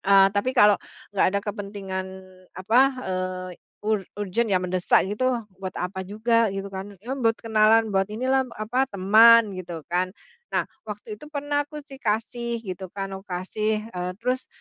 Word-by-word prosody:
Eee, 195 Hz, 0 st, +6 dB
tapi 205 Hz, +5 st, +1 dB
kalau 210 Hz, -3 st, +7 dB, 0.4 s
nggak 200 Hz, -, +3 dB
ada 200 Hz, -, +1 dB
kepentingan, 200 Hz, -2 st, -4 dB, 0.5 s
apa, 215 Hz, +7 st, +3 dB, 0.3 s
eee, 185 Hz, 0 st, -3 dB
y -, -, -25 dB, 0.2 s
ur 215 Hz, 0 st, +2 dB, 0.2 s
urgent 205 Hz, +3 st, -1 dB
ya, 190 Hz, -4 st, +1 dB
mendesak 180 Hz, 0 st, +3 dB
gitu, 210 Hz, +5 st, 0 dB, 0.3 s
buat 190 Hz, -1 st, -5 dB
apa 185 Hz, +1 st, -4 dB
juga? 230 Hz, +3 st, +2 dB
Gitu, 195 Hz, 0 st, -4 dB
kan. 195 Hz, +1 st, -7 dB
Yo, 250 Hz, +4 st, -3 dB
m -, -, -6 dB
buat 225 Hz, -1 st, +4 dB
kenalan, 220 Hz, 0 st, +4 dB
buat 195 Hz, -1 st, +2 dB
inilah, 260 Hz, +4 st, +1 dB
apa, 240 Hz, +5 st, 0 dB
teman, 215 Hz, +3 st, +7 dB
gitu 170 Hz, -3 st, -6 dB
kan. 185 Hz, +2 st, 0 dB, 0.4 s
Nah, -, -, +1 dB, 0.2 s
waktu 210 Hz, 0 st, -6 dB
itu 300 Hz, -, -12 dB
pernah, 290 Hz, -1 st, -1 dB
aku 300 Hz, 0 st, -8 dB
sih, 275 Hz, -2 st, -12 dB
kasih, 235 Hz, +1 st, -2 dB
gitu 190 Hz, -2 st, -6 dB
kan. 195 Hz, -1 st, -4 dB
Aku 190 Hz, +1 st, -9 dB
kasih. 215 Hz, +4 st, -2 dB
Eee, 180 Hz, -1 st, -3 dB
terus 255 Hz, +1 st, -1 dB
210 Hz, 175 wpm, -25 LUFS, 190-230 Hz, 0.5 s, kalau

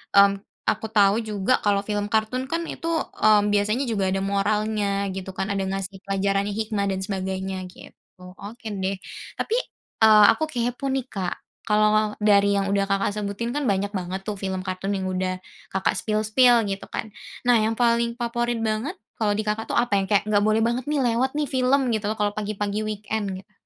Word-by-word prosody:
mmm, 200 Hz, 0 st, +8 dB, 0.4 s
aku 220 Hz, -, -4 dB
tahu 200 Hz, -1 st, +5 dB
juga 205 Hz, +3 st, +1 dB
kalau 205 Hz, -1 st, +2 dB
film 205 Hz, -1 st, -1 dB
kartun 220 Hz, +4 st, +1 dB
kan 330 Hz, +1 st, 0 dB
itu, 330 Hz, -, -6 dB, 0.4 s
mmm, 215 Hz, -1 st, +6 dB
biasanya 210 Hz, +6 st, +1 dB
juga 200 Hz, -3 st, 0 dB
ada 195 Hz, -, 0 dB
moralnya 210 Hz, +1 st, 0 dB, 0.3 s
gitu 190 Hz, 0 st, -6 dB
kan, 190 Hz, -, -1 dB
ada 195 Hz, -1 st, -1 dB
ngasih 195 Hz, 0 st, -4 dB
pelajaran 195 Hz, 0 st, 0 dB
hikmah 215 Hz, -2 st, -1 dB
dan 190 Hz, -, -2 dB
sebagainya, 190 Hz, -1 st, -3 dB, 0.2 s
gitu. -, -, -14 dB, 0.5 s
Oke 225 Hz, +3 st, -8 dB, 0.2 s
deh 195 Hz, +1 st, 0 dB, 0.4 s
tapi, 455 Hz, -, 0 dB, 0.5 s
eee, 215 Hz, -1 st, +8 dB
aku -, -, -2 dB
kepo 245 Hz, +1 st, -2 dB
nih 265 Hz, -2 st, -1 dB
,Kak, 185 Hz, -3 st, -3 dB, 0.3 s
kalau 215 Hz, 0 st, +3 dB
dari 200 Hz, -1 st, +4 dB
yang 195 Hz, -, +1 dB
udah, 200 Hz, 0 st, +2 dB
Kakak, 195 Hz, 0 st, +1 dB
sebutin 205 Hz, +3 st, -3 dB
kan 295 Hz, -, -1 dB
banyak 200 Hz, +1 st, 0 dB
banget 185 Hz, 0 st, -3 dB
tuh 210 Hz, -, -2 dB
film 190 Hz, -1 st, -3 dB
kartun 185 Hz, +1 st, -3 dB
yang 190 Hz, -1 st, -2 dB
udah, 185 Hz, 0 st, -2 dB, 0.3 s
Kakak, 190 Hz, -, +1 dB
spill-spill 220 Hz, +2 st, +3 dB
gitu 195 Hz, 0 st, -4 dB
kan, 220 Hz, -, -3 dB, 0.4 s
nah 245 Hz, -1 st, +6 dB
yang 220 Hz, +1 st, +1 dB
paling 235 Hz, 0 st, +2 dB
favorit 240 Hz, 0 st, -1 dB
banget 220 Hz, +8 st, -1 dB, 0.2 s
kalau 210 Hz, -2 st, +1 dB
di, 215 Hz, -, -2 dB
Kakak, 215 Hz, +1 st, -2 dB
tuh -, -, 0 dB
apa? 240 Hz, -3 st, +1 dB
Yang 195 Hz, -, -3 dB
kayak 205 Hz, -2 st, +3 dB
nggak 205 Hz, -, +4 dB
boleh 215 Hz, +1 st, +3 dB
banget 240 Hz, +2 st, 0 dB
nih 300 Hz, -, +1 dB, 0.2 s
lewat 260 Hz, +4 st, 0 dB
nih 300 Hz, -, +1 dB
film 260 Hz, -1 st, +2 dB
gitu 215 Hz, -1 st, -1 dB
loh 215 Hz, -, -2 dB
kalau 205 Hz, -1 st, 0 dB
pagi-pagi 205 Hz, 0 st, -2 dB
weekend 215 Hz, 0 st, -3 dB
gitu. 190 Hz, +3 st, -14 dB
210 Hz, 190 wpm, -24 LUFS, 195-225 Hz, 0.5 s, mmm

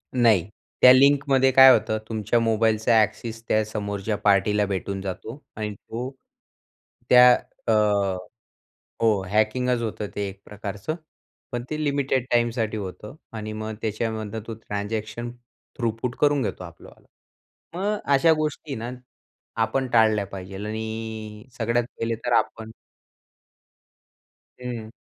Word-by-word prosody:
नाही. 110 Hz, -7 st, +4 dB, 0.3 s
त्या 125 Hz, -, +10 dB
लिंकमध्ये 135 Hz, 0 st, +4 dB
काय 130 Hz, +1 st, +9 dB
होतं 110 Hz, -2 st, +2 dB
तुमच्या 110 Hz, +1 st, 0 dB
मोबाईलचा 110 Hz, 0 st, +3 dB
एक्सेस 115 Hz, +2 st, -5 dB
त्या 110 Hz, -, +2 dB
समोरच्या 105 Hz, 0 st, -3 dB
पार्टीला 105 Hz, 0 st, +3 dB
भेटून 100 Hz, 0 st, -3 dB
जातो 105 Hz, +8 st, -6 dB
आणि 105 Hz, -1 st, -4 dB
तो, 120 Hz, +5 st, -6 dB, 1.0 s
त्या 125 Hz, 0 st, +9 dB, 0.4 s
अ, -, -, +3 dB, 1.3 s
हो, 110 Hz, -4 st, +3 dB
हॅकिंगच 115 Hz, +4 st, +1 dB
होतं 110 Hz, -2 st, -3 dB
ते 100 Hz, -1 st, -2 dB
एक 95 Hz, 0 st, -11 dB
प्रकारचं. 105 Hz, +6 st, -5 dB, 0.6 s
पण 120 Hz, -1 st, -3 dB
ते 155 Hz, 0 st, -2 dB
लिमिटेड 140 Hz, -3 st, 0 dB
टाईमसाठी 120 Hz, -2 st, +1 dB
होतं 105 Hz, +3 st, -7 dB, 0.2 s
आणि 110 Hz, 0 st, -5 dB
मग 110 Hz, 0 st, -5 dB
त्याच्यामधनं 110 Hz, 0 st, -3 dB
तो 115 Hz, -, -5 dB
ट्रान्झॅक्शन 110 Hz, +2 st, -4 dB, 0.5 s
थ्रुपूट 120 Hz, 0 st, -2 dB
करून 145 Hz, -2 st, +3 dB
घेतो 95 Hz, -5 st, -4 dB
आपलं 85 Hz, -1 st, -12 dB
वाल. -, -, -19 dB, 0.7 s
मग 205 Hz, +4 st, -1 dB, 0.2 s
अशा 160 Hz, +4 st, +5 dB
गोष्टी 150 Hz, -1 st, -3 dB
ना, 115 Hz, +2 st, -5 dB, 0.7 s
आपण 130 Hz, +4 st, 0 dB
टाळल्या 110 Hz, -3 st, +4 dB
पाहिजे 95 Hz, -1 st, -9 dB
आणि 110 Hz, 0 st, -5 dB
सगळ्यात 115 Hz, +1 st, +1 dB
पहिले 115 Hz, 0 st, -1 dB
तर 120 Hz, -, 0 dB
आपण 110 Hz, 0 st, -1 dB, 1.9 s
हं. 120 Hz, -3 st, -5 dB
110 Hz, 120 wpm, -24 LUFS, 105-120 Hz, 1.9 s, त्या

